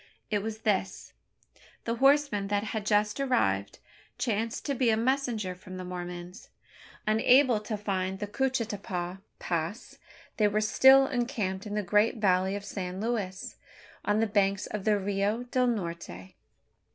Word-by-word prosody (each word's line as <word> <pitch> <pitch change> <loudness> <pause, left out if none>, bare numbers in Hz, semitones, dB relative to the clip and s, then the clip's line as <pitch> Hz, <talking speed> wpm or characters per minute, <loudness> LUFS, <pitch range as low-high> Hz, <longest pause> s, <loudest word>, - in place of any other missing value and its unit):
It 205 -1 +1
was 220 +1 -5
this: 195 -3 -1 0.7
the 230 0 -2
horseman 270 -6 +3
that 205 0 0
had 215 -1 -4
just 210 +2 +2
arrived, 100 - 0 0.4
chanced 225 -1 -2
to 280 - 0
be 255 -2 +2
a 220 - +3
messenger 235 -5 0
from 185 +1 -10
the 185 - -5
Mormons. 180 0 -7 0.6
Unable 235 +3 +4
to 215 0 -4
find 190 -2 -2
the 205 - -3
Coochetopa 205 -6 -2 0.2
Pass, 170 +7 -4 0.4
they 210 - +4
were 210 +1 +1
still 265 +5 +6
encamped 230 -7 -2
in 205 - -4
the 210 - 0
great 210 +5 +2
valley 190 -2 +2
of 205 0 -6
San 185 -2 -5
Luis, 205 -4 -3 0.5
on 205 +1 +1
the - - +3
banks 200 -2 +1
of 210 -2 -5
the 215 -1 +3
Rio 200 +3 -1
del 250 +1 +1
Norte. 170 - -4
210 Hz, 150 wpm, -29 LUFS, 190-230 Hz, 0.7 s, still